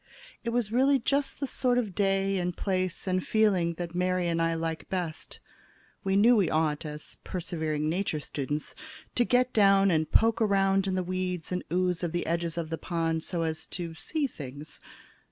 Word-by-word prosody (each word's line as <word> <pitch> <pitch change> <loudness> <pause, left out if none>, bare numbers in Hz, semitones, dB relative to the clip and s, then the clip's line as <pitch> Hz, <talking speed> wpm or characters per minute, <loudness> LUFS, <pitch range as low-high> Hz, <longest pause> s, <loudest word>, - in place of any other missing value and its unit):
It 235 - -1
was 230 -3 0
really 270 +4 +4
just 275 +3 -1
the 280 - -1
sort 250 -2 +1
of 220 -6 -1
day 195 0 +1
and 180 0 -2
place 185 -2 -1
and 185 -1 0
feeling 190 -6 +2
that 170 0 -5
Mary 180 0 +1
and 165 -1 0
I 165 0 +1
like 165 0 -3
best. 175 -4 -4 0.6
We 195 0 +1
knew 230 +5 +6
we 195 -7 +3
ought, 155 -1 0
as 150 0 -7
persevering 160 -4 -2
Nature 165 -1 -1
students, 145 +1 -4 0.4
to 245 - +3
get 250 +1 +2
down 195 -2 +5
and 155 -2 +1
poke 230 +1 +4
around 195 -2 +3
in 190 - 0
the 185 - 0
weeds 180 -2 -3
and 180 - -1
ooze 180 -1 +1
of 175 -2 -2
the 175 - -1
edges 170 0 -1
of 165 -1 -3
the 165 - -2
pond 165 -2 -1
so 170 0 -2
as 160 -1 -2
to 170 -2 -4
see 300 - -2
things. 145 - -7
180 Hz, 190 wpm, -28 LUFS, 165-200 Hz, 0.6 s, knew